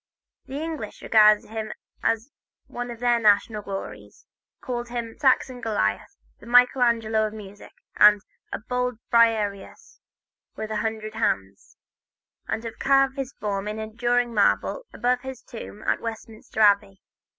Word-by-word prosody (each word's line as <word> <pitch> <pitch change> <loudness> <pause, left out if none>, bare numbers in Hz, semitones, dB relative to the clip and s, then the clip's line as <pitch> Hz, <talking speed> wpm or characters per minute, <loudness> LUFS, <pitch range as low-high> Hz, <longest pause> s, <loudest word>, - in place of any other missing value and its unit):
The 275 +2 -5
English 310 -9 -6
regard 215 -1 +5
him 220 0 -6 0.3
as 230 +4 -1 0.3
one 245 0 -6
of 235 -1 -8
their 240 -1 +3
national 210 0 +3
glories, 195 -1 -8 0.3
call 245 -2 -4
him 235 -1 -5
the - - -26
"Saxon 260 -2 +2
Goliath," 150 - -1 0.2
the - - -14
"Michael 245 +2 +5
Angelo 225 -2 +2
of 215 - -9
music," 205 -1 -11 0.3
a 210 - +9 0.6
"Bold 250 -1 -1
Briareus 225 - +1 0.6
with 220 0 -5
a 215 - -1
hundred 215 0 -3
hands," 100 - -2 0.7
and 225 - -3
have 230 -1 -7
carved 270 -1 +3
his 270 -1 -5
form 200 -1 -3
in 210 +1 -4
enduring 240 +2 -1
marble 350 - +1
above 245 0 0
his 265 0 -8
tomb 220 -2 -10
in - - 0
Westminster 225 -1 -6
Abbey. 200 -2 +4
225 Hz, 140 wpm, -25 LUFS, 210-245 Hz, 0.7 s, a